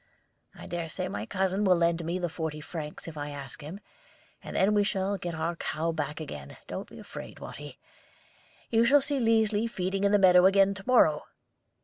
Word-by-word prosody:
I - - -10
dare 170 -2 -4
say 185 +3 -2
my 195 - -5
cousin 190 +1 0
will 185 -3 +5
lend 170 0 +1
me 170 +2 -2
the 180 -1 -1
forty 160 -2 -4
francs 150 0 -7
if 160 -2 -8
I 145 0 -4
ask 140 -3 -6
him, 160 +7 -8 0.6
and - - -8
then 200 +2 +3
we 205 -1 +4
shall 200 -1 -1
get 175 -3 -5
our 165 +2 -2
cow 165 0 -2
back 155 -1 -3
again. 75 - -8
Don't - - -6
be - - -12
afraid, - - -9
Watty. - - -9 0.9
You 225 0 +4
shall 280 +5 +5
see 280 0 0
Liesli 225 -1 +2
feeding 195 -2 -2
in 200 - +3
the 205 - +6
meadow 180 -2 +7
again 195 0 +4
to 195 0 -9
morrow." 155 -12 +4
180 Hz, 200 wpm, -28 LUFS, 160-200 Hz, 0.9 s, meadow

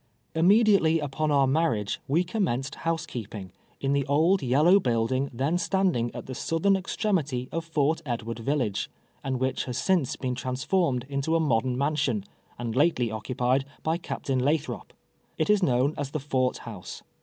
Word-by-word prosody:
Immediately 190 -1 +4
ui)on 150 0 -2
our 140 -2 +4
marriage 130 -8 0
we 160 +6 +2
commenced 170 - -1
house 165 -1 -2
keeping, 105 -5 -7 0.3
in 135 0 0
the 140 0 +2
old 160 +7 +3
yellow 150 +10 +5
building 130 - 0
then 140 +8 0
stand 190 0 +1
ing 120 0 0
at - - -6
the 130 - -6
southern 165 +9 +1
extremity 170 - -1
of 165 - -2
Fort 160 -1 0
Edward 115 -4 -4
village, 115 -5 -1 0.3
and 130 -2 -2
whicli 130 0 -1
has 125 -1 -4
since 175 -4 +1
been 125 -1 -3
transformed 130 +2 0
into 140 +3 -1
a - - +3
modern 125 -4 +1
mansion, 140 -7 0 0.3
and 120 -1 -4
lately 130 -5 +2
occupied 125 +4 0 0.2
by 160 +2 0
Ca]>tain 135 -6 -2
Lathrop. 150 +3 -1 0.5
It - - +2
is 210 -1 +3
known 135 -2 +2
as 145 -2 -2
the 155 - -3
Fort 130 -2 0
House. 105 -6 -9
140 Hz, 165 wpm, -27 LUFS, 125-165 Hz, 0.5 s, yellow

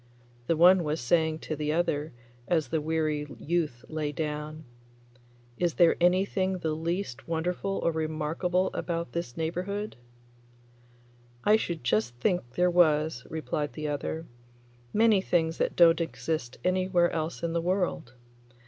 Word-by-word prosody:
The 165 - +2
one 180 +2 +7
was 150 +1 -1
saying 160 +5 +1
to 155 - -4
the 150 0 -1
other 155 -2 0 0.4
as 160 -4 +1
the 160 -1 0
weary 155 -1 -1
youth 155 -7 -2
lay 155 -2 -2
down, 150 0 -4 1.0
'Is 175 -2 +1
there 170 -2 +5
anything 185 +1 +2
the 160 -3 -2
least 165 -4 -3
wonderful 180 +4 -1
or 170 - +3
remarkable 160 +4 -1
about 170 -1 -3
this 170 -8 -4
neighbourhood?' 185 +5 -3 1.5
'I 210 - +6
should 170 - -2
just 120 0 +1
think 125 - -1
there 180 0 +3
was,' 155 -6 +2
replied 150 -2 -3
the 155 -1 -4
other; 155 +3 -3 0.7
'many 215 -2 +4
things 165 -3 0
that - - 0
don't 170 -1 +6
exist 160 -6 -3
anywhere 185 -1 +2
else 160 +1 -3
in 165 -1 -1
the 170 - +1
world. 175 -8 -1
165 Hz, 140 wpm, -28 LUFS, 155-180 Hz, 1.5 s, one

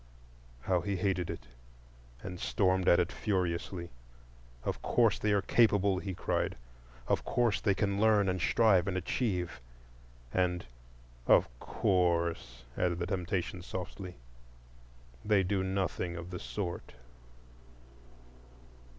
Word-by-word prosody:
How 90 +4 +1
he 100 +3 -2
hated 95 -2 0
it, - - -6 0.8
and 90 -1 -6
stormed 95 -2 +1
at 85 - +6
it 90 0 +1
furiously! 90 -3 -2 0.7
"Of - - -3
course 115 -3 +2
they 105 - +1
are 100 -1 +2
capable," 100 -5 +3
he 95 -1 -5
cried; - - -1 0.5
"of - - +1
course 120 -4 +1
they 100 -3 +2
can 100 0 0
learn 105 -3 +4
and 90 -1 0
strive 100 -1 +4
and 95 -1 -1
achieve—" 90 - -2 0.7
and 90 -1 +1 0.6
"Of - - +6
course," 85 -9 0
added 90 -1 0
the 85 - -2
temptation 90 -1 -2
softly, 90 +1 -6 1.1
"they 105 -2 +3
do 95 +1 0
nothing 95 -2 -2
of 85 +1 -7
the 90 - -5
sort." 90 -4 -5
95 Hz, 120 wpm, -31 LUFS, 90-100 Hz, 1.1 s, at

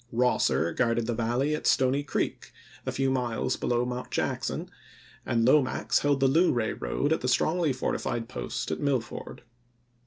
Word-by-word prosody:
Eosser 115 -8 +1
guarded 115 -2 +1
the 120 - -1
Valley 120 +6 0
at 150 - -2
Stony 130 +1 +3
Creek, 145 - -3 0.4
a - - +1
few 135 -1 0
miles 125 -3 -1
below 120 0 0
Mt. 125 0 -4
Jack - - -1
son, - - -3 0.6
and 115 -1 +2
Lomax 130 0 +3
held 145 -1 +1
the 135 - +4
Luray 130 -6 +2
road 140 - -1
at 160 - -2
the 125 - -2
strongly 160 +5 +2
fortified 120 -2 -2
post - - -4
at 80 - -2
Millford. 135 -5 -3
125 Hz, 160 wpm, -28 LUFS, 120-140 Hz, 0.6 s, the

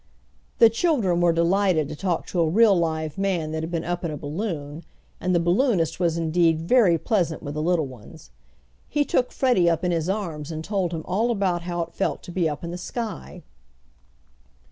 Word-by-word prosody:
The 230 -1 +7
children 225 - +1
were 175 -1 +4
delighted 170 -1 +2
to - - -6
talk 175 +1 -2
to 180 - -3
a 165 -2 +3
real 210 +3 +5
live 160 -2 -2
man 180 -6 -1
that 160 0 -3
had 160 - -4
been 170 -2 -2
up 175 +1 -3
in 170 - -1
a 150 - -5
balloon, 150 -1 -5 0.4
and 180 0 0
the - - +4
balloonist 175 - +1
was 170 -2 +1
indeed 165 0 +2
very 175 0 +4
pleasant 175 -4 -1
with 145 - -5
the 155 - -3
little 165 -1 +1
ones. 120 - -13 0.6
He 290 0 +1
took 250 - 0
Freddie 240 -10 +3
up 165 +1 0
in 180 - +1
his 165 0 -1
arms 170 -7 -3
and 160 0 -5
told 190 -2 -1
him 160 -2 -4
all 215 +6 0
about 195 -6 0
how 175 0 -2
it 165 - -12
felt 195 - -2
to 180 - -9
be 170 -2 +1
up 150 +2 -6
in 170 - -4
the 175 - -6
sky. 225 +3 -6
175 Hz, 205 wpm, -24 LUFS, 160-195 Hz, 0.6 s, The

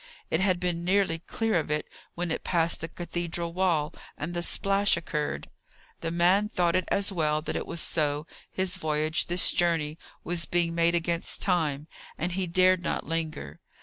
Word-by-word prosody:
It - - +2
had 185 -2 +2
been 175 -1 -1
nearly 185 -2 +2
clear 220 +3 0
of 155 - -4
it 150 0 -1 0.3
when 175 -1 -2
it - - -2
passed 170 -2 +2
the 165 - -3
cathedral 170 0 -4
wall, 170 -5 +1 0.2
and 165 +4 -4
the 175 - -1
splash 195 +3 +2
occurred. 150 -2 -3 0.5
The - - -2
man 180 +5 +3
thought 175 -4 +1
it 185 - +2
as 200 0 +1
well 155 -4 +1
that - - -3
it - - -3
was 170 -1 -3
so; 150 -1 0 0.2
his 190 -1 -1
voyage, 155 +1 0
this 175 0 +4
journey, 165 -2 +1 0.2
was 170 -2 0
being 170 0 +1
made 170 0 +3
against 170 0 -1
time, 155 -6 +1 0.3
and 175 +3 -2
he 185 +1 -1
dared 185 +1 +4
not - - -2
linger. 155 - -3
170 Hz, 180 wpm, -28 LUFS, 160-180 Hz, 0.5 s, this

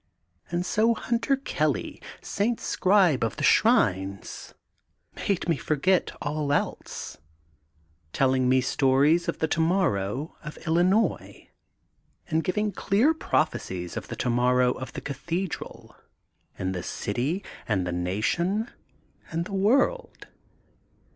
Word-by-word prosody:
And 175 +1 -1
so 225 +4 +2
Hunter 235 +5 0
Kelly, 275 - -2 0.2
St. 225 +3 -1
Scribe 185 - +3
of 115 - -1
the - - -4
Shrines, 95 +2 +2 0.6
made 195 -4 -1
me 165 -4 +2
forget 155 +8 +1
all 150 -1 -1
else, 145 - -3 0.9
telling 130 - +2
me 130 0 +4
stories 140 +6 +3
of - - -1
the 160 - 0
tomorrow 155 - 0
of 150 -1 -8
Illinois 180 +7 +1 0.8
and 160 0 +1
giving 210 +3 0
clear 215 - +2
prophecies 95 - -2
of - - -5
the - - -6
tomorrow 125 +1 +2
of 130 +1 -6
the - - -6
Cathe 170 +7 -3
dral, - - -8 0.6
in 95 0 -2
the 90 -2 -3
city 130 - -2 0.2
and 95 -5 0
the 90 - -2
nation 120 - -1 0.6
and 165 +1 -2
the 200 - -8
world. 275 - +1
160 Hz, 120 wpm, -26 LUFS, 125-195 Hz, 0.9 s, me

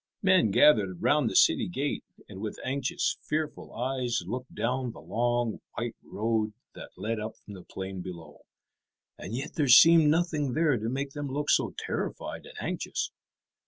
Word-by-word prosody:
Men 185 - +5
gathered 100 - +4
round 145 -5 +3
the 95 - -6
city - - +5
gate, 145 -4 -2 0.2
and 100 -2 -9
with 110 -1 -4
anxious, 130 0 -1
fearful 155 0 -3
eyes 125 -1 -1
looked 125 +1 -6
down 125 0 -1
the - - -12
long 120 0 -1
white 120 -1 -3
road 110 -1 -1 0.2
that - - -10
led 110 +1 -2
up 110 +1 -6
from 105 - -12
the 95 - -9
plain 95 0 -6
below. 85 -4 -9 0.8
And 100 +5 -6
yet 135 +4 -5
there 150 -3 0
seemed 160 +4 +8
nothing 155 -4 +1
there 155 -2 +3
to 110 0 -2
make 135 +2 -3
them 145 0 -5
look 145 +2 -1
so - - +2
terrified - - -4
and - - -13
anxious. - - -3
125 Hz, 165 wpm, -28 LUFS, 110-145 Hz, 0.8 s, seemed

